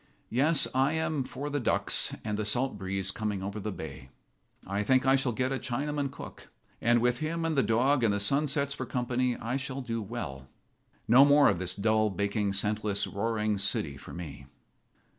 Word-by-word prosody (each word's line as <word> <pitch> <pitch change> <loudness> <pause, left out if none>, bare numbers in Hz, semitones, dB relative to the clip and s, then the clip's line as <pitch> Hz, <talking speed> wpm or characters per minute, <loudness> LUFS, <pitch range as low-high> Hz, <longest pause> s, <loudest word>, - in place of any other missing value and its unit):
Yes, 140 +6 +4
I 135 +3 +2
am 160 -3 -1
for 140 +3 -6
the 145 - 0
ducks 120 - +2
and 105 -1 -2
the 110 - -2
salt 125 +4 +2
breeze 95 -1 -2
coming 105 -3 -3
over 100 +2 -4
the 105 +1 -4
bay. 80 -7 -8 0.6
I 100 +2 -2
think 130 +5 +2
I 135 0 +5
shall 135 -2 0
get 130 +3 -1
a 135 - -1
Chinaman 140 +3 -2
cook, 140 - -11 0.3
and 120 0 +3
with 125 0 +1
him 165 +2 -2
and 165 -1 0
the 135 - +4
dog 125 +3 +2
and 110 - +4
the 100 - 0
sunsets 140 +5 +1
for 130 -2 -6
company 125 0 -1
I 120 +3 -3
shall 135 0 -4
do 115 -2 -3
well. 80 - -6 0.6
No 125 +4 +8
more 145 0 +6
of - - 0
this 90 0 -3
dull, 110 +1 +2
baking, 100 +1 -1
senseless, 105 0 -1
roaring 105 0 -1
city 80 -7 -1
for 70 - -12
me." 70 -6 -8
115 Hz, 190 wpm, -29 LUFS, 100-135 Hz, 0.6 s, No